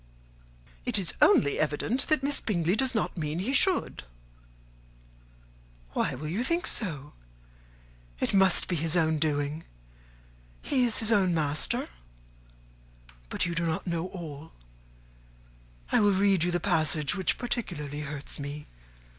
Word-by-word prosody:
"It - - +1
is 190 -4 0
only 280 - +4
evident 155 - -1
that 310 -4 +2
Miss 285 +1 +3
Bingley 175 -3 0
does 260 +2 +1
not 220 - -1
mean 150 0 -3
he 210 +10 -2
should." 370 +5 +2 1.9
"Why - - -1
will 150 +4 -6
you 190 +10 -2
think 335 +6 0
so? 150 - -1 1.1
It - - -1
must 190 -2 +5
be 180 - -1
his 165 +3 +2
own 160 -2 +1
doing; 145 0 -1 1.0
he 255 -3 +1
is 235 - +3
his 220 0 +2
own 190 -5 +3
master. 150 -2 0 1.4
But - - -2
you 170 - -3
do 170 0 -1
not 160 - -2
know 170 -1 -2
all. 160 -4 -9 1.4
I - - +4
will 205 -2 +4
read 195 -2 +2
you 175 - +1
the 175 0 0
passage 155 -3 0
which 190 -3 -1
particularly 165 - -4
hurts 150 -1 -6
me. 145 +1 -6
170 Hz, 140 wpm, -28 LUFS, 150-210 Hz, 1.9 s, must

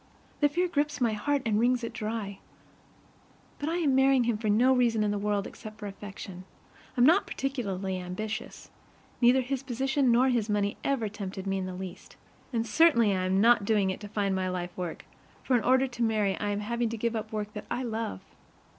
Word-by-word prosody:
The 290 - +4
fear 350 +5 +1
grips 295 -3 -1
my 235 -3 +2
heart 280 +6 0
and 215 -2 +2
wrings 245 +1 +2
it 230 - -4
dry. 215 -2 -4 1.2
But 290 - -2
I 330 - -1
am 305 -6 +2
marrying 265 -1 +4
him 235 -1 +1
for 215 0 -2
no 245 +6 +5
reason 235 -4 +2
in 210 - +1
the 205 - -1
world 205 -1 0
except 215 0 -10
affection. 195 -2 -8 0.5
I'm 245 - +6
not 345 +8 +5
particularly 195 -9 -3
ambitious. 210 +5 -6 0.5
Neither 250 +2 +5
his 260 +1 -3
position 270 +1 +1
nor 250 +3 +4
his 230 -4 0
money 205 -1 0
ever 270 -6 0
tempted 195 -2 -6
me 195 0 -1
in 185 - -3
the 185 - -6
least. 185 -1 -8 0.4
And 230 -2 0
certainly 235 -4 +4
I 185 0 -1
am 190 +1 +2
not 235 -1 +5
doing 200 -2 +2
it - - -6
to 210 - -8
find 200 -1 -1
my 185 0 -1
life 180 -1 -4
work, 175 -3 -5 0.4
for 260 - +2
in 235 - +2
order 260 +3 +4
to 240 -1 -8
marry 215 -4 +2
I 205 - -1
am 205 0 -1
having 235 +2 -1
to 230 - -4
give 230 +1 -1
up 220 0 -3
the 220 - -6
work 210 0 -4
that 210 - -7
I 255 - -2
love. 225 - -3
220 Hz, 210 wpm, -28 LUFS, 200-250 Hz, 1.2 s, I'm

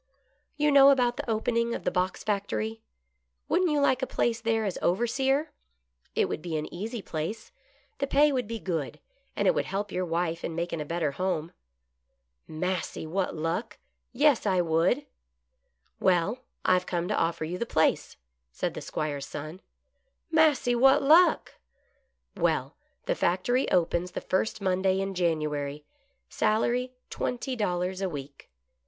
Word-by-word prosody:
"You 300 0 +3
know 280 -1 +8
about 250 -3 +3
the 290 -4 -5
opening 235 +1 0
of - - -6
the - - 0
box 185 0 -1
factory. 215 +2 -2 0.7
Wouldn't 360 +1 +2
you 300 -1 +2
like 265 -2 +2
a 260 - -1
place 230 -1 0
there 225 -1 +1
as 195 - -3
overseer.^ 265 - +1 0.7
It - - +2
would - - -4
be 165 -2 -3
an 150 - -3
easy 215 +4 -5
place, 170 +9 -5 0.5
the 275 - 0
pay 290 +2 +4
would 250 -5 -1
be 230 +1 -4
good, 170 -8 -3 0.4
and - - +1
it - - +5
would - - 0
help 200 +1 -3
your 185 - -1
wife 170 -1 -2
in 165 - -3
making 170 -1 -2
a - - -4
better 165 -1 -1
home." 170 0 -2 1.0
"Massy, 180 +2 -3
what 180 +3 -2
luck! 170 +8 -3 0.3
Yes, 275 -3 +3
I 185 -2 +2
would." 175 - +2 0.5
" 65 0 -46
Well, 190 +5 +2 0.3
I - - +5
have 180 0 +1
come 175 -1 -1
to 210 - +1
offer 165 -1 0
you 180 +3 -4
the 235 - -2
place," 160 -6 +1 0.3
said 65 - -3
the - - -6
'Squire's 145 -2 -3
son. 155 +6 -7 0.4
" - - -48
Massy, 310 -6 +4
what 270 +4 +5
luck! 330 +6 +5 0.3
" - - -42
" - - -52
Well, - - 0 0.3
the - - +1
factory 245 - +1
opens 175 +1 +1
the - - -4
first 215 +3 -1
Monday 190 0 +1
in 195 0 -2
January. 150 -4 -1 0.4
Salary 240 +4 0 0.2
twenty 255 +1 -3
dollars 185 -3 -1
a 190 - 0
week." 140 -3 -9
195 Hz, 165 wpm, -28 LUFS, 170-245 Hz, 1.0 s, know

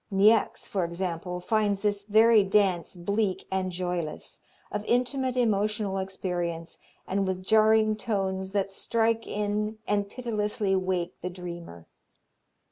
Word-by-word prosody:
Niecks, 210 +3 +3
for 190 -3 -1
example, 175 0 -3
finds 205 +1 +1
this 205 -1 0
very 220 +1 +6
dance 195 -3 +1
bleak 200 +2 -1
and 190 -1 -1
joyless, 175 -3 -4 0.3
of 210 - -3
intimate 255 +1 0
emotional 210 -3 +1
experience, 175 -3 -4 0.3
and 195 0 0
with 185 0 -2
"jarring 215 +1 +4
tones 190 -4 -2
that 195 -1 0
strike 225 +3 0
in 210 +1 -2
and 205 -1 0
pitilessly 210 -4 -1
wake 185 -2 -1
the 180 - -3
dreamer." 170 - -8
200 Hz, 125 wpm, -27 LUFS, 185-215 Hz, 0.3 s, very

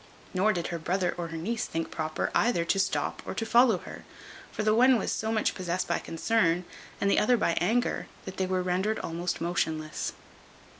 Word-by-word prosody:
Nor 195 +3 +3
did 175 -4 -2
her 170 -1 -3
brother 180 +3 0
or 170 -1 -4
her 165 0 -6
niece 220 +8 -2
think 165 0 -3
proper 155 -1 -2
either 175 -9 +2
to 195 - +1
stop 190 0 0
or - - -6
to 225 - -2
follow 235 -2 +5
her; - - -10 0.5
for 215 - -3
the 215 0 +3
one 250 +3 +6
was - - -2
so 220 0 -1
much 220 -1 +1
possessed 180 -1 -2
by - - 0
concern, 175 -1 +1 0.3
and 200 - +1
the 200 - +4
other 245 +3 +4
by 170 - +1
anger, 235 +7 +1 0.2
that 190 - -7
they 190 - 0
were 185 0 0
rendered 185 +4 0
almost 170 +2 -3
motionless. 160 -2 -2
185 Hz, 200 wpm, -28 LUFS, 170-220 Hz, 0.5 s, one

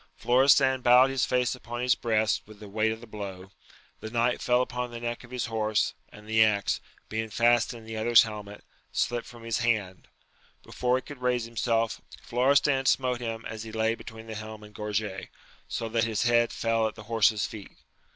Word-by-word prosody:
Florestan 130 +1 +4
bowed 125 +2 +6
his 135 -2 +1
face 125 -1 +1
upon 120 -1 -6
his 125 0 +4
breast 110 -2 +1
with 105 -1 -14
the 105 - -10
weight 110 +2 0
of 110 0 -6
this 120 - -13
blow: 95 -2 -7 0.5
the 110 - -7
knight 120 +2 +1
fell 125 0 +3
upon 125 0 -4
the 120 0 -7
neck 120 +1 -4
of 120 - -14
his 125 -1 -3
horse, 110 -2 0 0.2
and 105 - -14
the 110 0 +5
axe, 100 -2 +1 0.3
being 110 0 -3
fast 120 +2 +3
in 115 -2 -10
the 110 0 -7
other's 115 +1 +6
helmet, 105 -2 -8 0.3
slipt 120 -1 -1
frt)m 120 -1 -12
his 115 -1 -1
hand; 110 -6 -1 0.6
before 125 0 0
he 130 - -2
could 140 -1 -11
raise 125 -2 +1
himself, 115 -1 -1 0.2
Florestan 135 +2 +2
smote 125 -2 +2
him 115 -1 -4
as 110 -1 -6
he 110 0 -7
lay 110 +1 +1
between 115 -1 -10
the 110 - -7
helm 110 0 -8
and 105 0 -13
gorget, 105 -2 -3 0.4
so 115 - -3
that 115 0 0
his 110 -2 -1
head 120 0 +3
fell 115 -1 +1
at 110 - -7
the 110 - -10
horse's 110 -1 +2
feet. 105 -3 -8
115 Hz, 200 wpm, -27 LUFS, 110-120 Hz, 0.6 s, bowed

